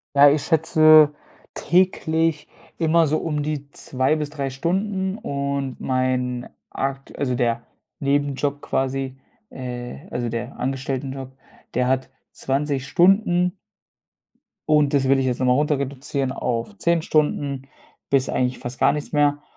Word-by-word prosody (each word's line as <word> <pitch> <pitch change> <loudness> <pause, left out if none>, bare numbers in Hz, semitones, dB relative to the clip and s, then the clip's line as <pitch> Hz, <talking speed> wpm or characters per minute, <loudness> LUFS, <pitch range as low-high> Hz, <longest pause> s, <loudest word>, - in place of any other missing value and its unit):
Ja, 140 +1 +8
ich 145 0 +1
schätze 155 -1 +5 0.4
täglich 165 -3 +1 0.3
immer 165 0 +3
so 150 - +1
um 150 -2 -2
die 145 -1 -4
2 130 +1 0
bis 150 -2 -2
3 140 -2 -4
Stunden 190 +7 -1
und 140 - -3
mein 130 -1 -1 0.2
aktue 135 0 -4
also 125 -3 -1
der 120 -1 0 0.4
Nebenjob 145 0 0
quasi, 135 -1 -2 0.3
äh 125 +4 -7
also 120 -1 -2
der 115 -1 -5
Angestelltenjob, 135 0 -3 0.4
der 125 0 +1
hat 130 0 0 0.2
20 140 0 -2
Stunden. 180 +1 +3 1.1
Und 150 -2 +3
das 135 -2 +2
will 135 0 +4
ich 130 - +1
jetzt 125 -1 -1
nochmal 125 0 +3
runter 150 -1 +1
reduzieren 135 0 -3
auf 125 - -3
10 170 -1 +2
Stunden 145 -3 0 0.5
bis 135 -1 +2
eigentlich 125 0 0
fast 120 +1 -7
gar - - +4
nichts 150 +1 -5
mehr. 145 0 +2
140 Hz, 135 wpm, -22 LUFS, 130-155 Hz, 1.1 s, Ja